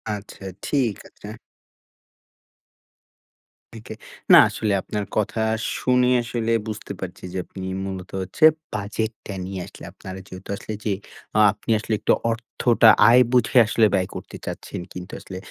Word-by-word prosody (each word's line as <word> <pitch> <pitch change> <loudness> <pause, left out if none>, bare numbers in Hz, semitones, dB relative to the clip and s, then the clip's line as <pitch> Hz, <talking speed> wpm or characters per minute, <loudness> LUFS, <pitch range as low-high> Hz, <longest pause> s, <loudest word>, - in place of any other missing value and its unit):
আচ্ছা, 100 -1 -11 0.2
ঠিক 125 -8 +1
আছে। 105 - -13 2.5
থেকে, - - -9 0.4
না - - +11
আসলে 105 -2 -1
আপনার 105 -2 -4
কথা 110 +1 0 0.4
শুনে 125 0 +2
আসলে 115 -1 -2 0.2
বুঝতে 105 -1 -6
পারছি 90 -1 -7
যে, - - -3
আপনি 95 -1 -8 0.2
মূলত 95 -1 -6
হচ্ছে 95 +11 -4 0.3
বাজেটটা 105 0 -4
নিয়ে 95 -1 -5
আসলে - - -13
আপনারা 95 0 -9
যেহেতু 95 +1 -11
আসলে 110 - -7
যে, 105 - +1 0.4
আ - - +5
আপনি 115 - -5
আসলে 110 0 -1 0.4
অর্থটা 115 0 +3 0.2
আয় 125 +2 +7
বুঝে 125 +1 +3
আসলে 110 +1 +3
ব্যয় 95 -2 +1
করতে - - -8
চাচ্ছেন। - - -6
কিন্তু 90 0 -8
আসলে 95 - -9
105 Hz, 135 wpm, -23 LUFS, 95-115 Hz, 2.5 s, না